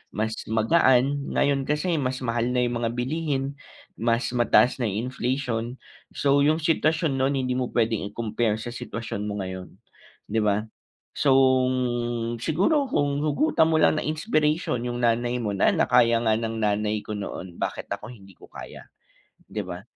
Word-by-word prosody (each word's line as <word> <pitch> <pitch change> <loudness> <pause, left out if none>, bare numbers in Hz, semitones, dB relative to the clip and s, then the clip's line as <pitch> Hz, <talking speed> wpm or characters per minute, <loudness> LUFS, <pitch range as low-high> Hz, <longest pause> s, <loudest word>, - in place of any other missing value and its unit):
mas 110 +1 -1 0.2
magaan 130 +4 +3
ngayon 140 -1 +1
kasi 155 +3 0
mas 130 -1 -2
mahal 115 0 0
na 125 - +3
yung 120 -1 -1
mga 115 -1 0
bilihin, 140 +1 -2 0.4
mas 115 +2 0
mataas 125 +1 +3
na 120 - 0
inflation. 120 +2 -2 0.4
So, 140 0 +3
yung 155 +3 +2
sitwasyon 155 -3 +1
nun 135 +2 +1
hindi 130 -1 -1
mo 125 - -1
puwedeng 110 -4 0
i-compare 110 0 -1
sa 115 +2 -6
sitwasyon 115 -3 -5
mo 105 -1 -3
ngayon, 95 0 -7 0.6
di 110 - +1
ba? 105 -1 +1 0.6
So, 135 -2 +4 1.0
siguro 235 - +1
kung 145 - 0
hugutan 160 - +2
mo 160 - +1
lang 155 +1 +4
na - - -5
inspiration 155 -3 0
yung 120 0 -3
nanay 120 +1 +1
mo 105 - -1
na 100 -1 +2
na - - +3
kaya 120 -2 +4
nga 110 -1 +2
ng 115 -1 -3
nanay 105 0 0
ko 110 - -8
noon 95 -3 -7
bakit - - -4
ako 105 - -4
hindi 100 -4 -15
ko - - -15
kaya, - - -11 0.6
di 105 -2 -5
ba? 90 0 -7
120 Hz, 160 wpm, -25 LUFS, 110-140 Hz, 1.0 s, So